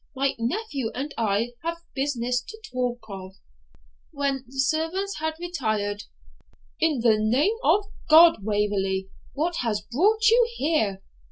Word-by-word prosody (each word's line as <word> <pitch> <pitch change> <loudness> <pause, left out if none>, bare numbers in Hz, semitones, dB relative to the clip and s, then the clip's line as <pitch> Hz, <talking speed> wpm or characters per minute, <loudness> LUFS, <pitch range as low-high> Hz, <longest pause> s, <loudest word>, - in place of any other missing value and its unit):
My 275 +1 +1
nephew 275 - -2
and 280 +3 -4
I 225 +2 0
have 335 +1 -3 0.2
business 250 -3 -1
to 440 - -11
talk 245 -1 -1
of.' 190 -2 -8 0.8
When 275 -3 -2
the 265 +2 -13
servants 325 +6 0
had 315 0 -2
retired, 215 -12 -2 0.7
'In 310 -6 +1
the 225 -2 +4
name 255 - +2
of 410 0 +3 0.2
God, 330 +2 +8
Waverley, 195 -2 0 0.2
what 330 +5 -1
has 210 -4 -1
brought 430 - +3
you 470 +1 +5
here? 220 - 0
265 Hz, 135 wpm, -25 LUFS, 215-325 Hz, 0.8 s, God